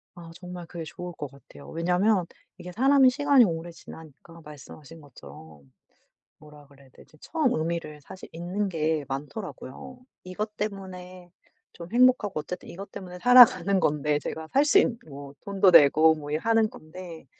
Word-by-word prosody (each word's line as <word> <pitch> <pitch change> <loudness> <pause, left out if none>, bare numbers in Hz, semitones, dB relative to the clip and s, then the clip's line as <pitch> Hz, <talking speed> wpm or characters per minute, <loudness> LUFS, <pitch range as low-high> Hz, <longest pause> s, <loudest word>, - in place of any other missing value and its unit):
아 170 -1 -12
정말 180 -1 -9
그게 170 0 -7
좋을 175 +3 -8
것 150 -3 -7
같아요. 140 +1 -16
왜냐하면 180 +4 +1 0.3
이게 180 - -9
사람이 265 +5 +4
시간이 275 -1 +4
오래 170 -2 -4
지나니까 160 0 -14
말씀하신 150 +1 -13
것처럼 75 - -15 0.7
뭐라 150 -1 -16
그래야 140 -1 -20
되지? 155 - -20
처음 310 -6 -1
의미를 155 -2 -4
사실 185 +6 -12
잊는 180 +5 -3
게 155 -3 -1
많더라고요. 150 - -8 0.2
이것 210 +4 -6
때문에 185 -3 -7 0.4
좀 170 -1 -11
행복하고 240 - +3
어쨌든 180 - -8
이것 195 +3 -10
때문에 180 -1 -9
살아가는 205 -5 +6
건데 150 -1 0
제가 160 +2 -6
살 280 +2 +4
수 310 +7 +4
있는 245 -11 +2
뭐 140 0 -11
돈도 200 -2 +2
내고 155 +2 +6
뭐 145 -2 -9
이 150 - 0
하는 225 +5 +1
건데 165 -1 -12
175 Hz, 340 characters per minute, -26 LUFS, 150-200 Hz, 0.7 s, 살아가는